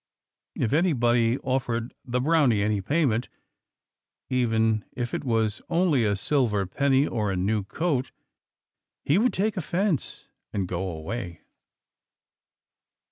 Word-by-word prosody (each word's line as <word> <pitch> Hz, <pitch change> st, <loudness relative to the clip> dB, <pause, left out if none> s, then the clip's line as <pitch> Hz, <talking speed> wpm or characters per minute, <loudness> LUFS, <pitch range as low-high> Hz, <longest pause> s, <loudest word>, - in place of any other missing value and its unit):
If 115 Hz, -, -1 dB
anybody 120 Hz, -8 st, +3 dB
offered 120 Hz, -2 st, -1 dB
the 125 Hz, -1 st, -1 dB
Brownie 135 Hz, -7 st, +3 dB
any 105 Hz, -1 st, 0 dB
payment, 125 Hz, -, +1 dB, 1.0 s
even 110 Hz, -4 st, +2 dB
if 120 Hz, -1 st, -4 dB
it -, -, -2 dB
was 110 Hz, -4 st, 0 dB
only 165 Hz, -8 st, +2 dB
a 100 Hz, -1 st, +2 dB
silver 105 Hz, -3 st, +1 dB
penny 135 Hz, +7 st, +2 dB
or 110 Hz, -6 st, -1 dB
a -, -, -1 dB
new 100 Hz, +3 st, 0 dB
coat, 140 Hz, -, -1 dB, 0.9 s
he 150 Hz, +7 st, +3 dB
would 245 Hz, +3 st, +3 dB
take 205 Hz, +1 st, -1 dB
offence 180 Hz, -1 st, -1 dB, 0.3 s
and 95 Hz, -3 st, -1 dB
go 90 Hz, +1 st, -3 dB
away. 85 Hz, +2 st, -6 dB
120 Hz, 120 wpm, -26 LUFS, 105-145 Hz, 1.0 s, anybody